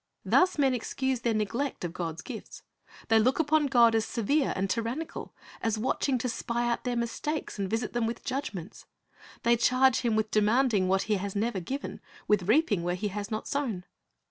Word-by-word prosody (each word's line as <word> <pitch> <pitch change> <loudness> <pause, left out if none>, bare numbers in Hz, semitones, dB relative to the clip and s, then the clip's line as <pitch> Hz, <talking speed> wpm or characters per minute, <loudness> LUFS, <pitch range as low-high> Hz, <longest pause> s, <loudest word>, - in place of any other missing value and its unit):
Thus 365 -2 +4
men 270 -3 +3
excuse 260 +1 -1
their 235 -1 0
neglect 230 +6 -2
of 170 -1 -3
God's 165 -3 -4
gifts. - - -9 0.5
They 225 0 +6
look 255 +4 +3
upon 310 -1 +3
God 240 -4 +5
as 225 -1 +2
severe 265 +7 0
and 195 +1 0
tyrannical, 235 +10 -3 0.3
as 225 -1 0
watching 260 +3 0
to 250 +1 -2
spy 235 0 -2
out 235 +1 -1
their 245 -1 0
mistakes 235 +3 -3
and 195 -1 -1
visit 225 +1 -2
them 240 -2 +1
with 230 - -5
judgments. 255 - -5 0.6
They 235 +1 +5
charge 255 +2 +4
Him 235 -3 0
with 220 0 0
demanding 215 -1 +3
what 190 +1 +2
He 215 -2 +1
has 200 +1 -4
never 210 -1 0
given, 265 +11 -5 0.3
with 205 -3 +2
reaping 225 - +3
where 175 +1 -1
He 205 +3 -2
has 200 +1 -5
not 215 -1 -4
sown. 245 -11 -2
230 Hz, 190 wpm, -28 LUFS, 210-260 Hz, 0.6 s, They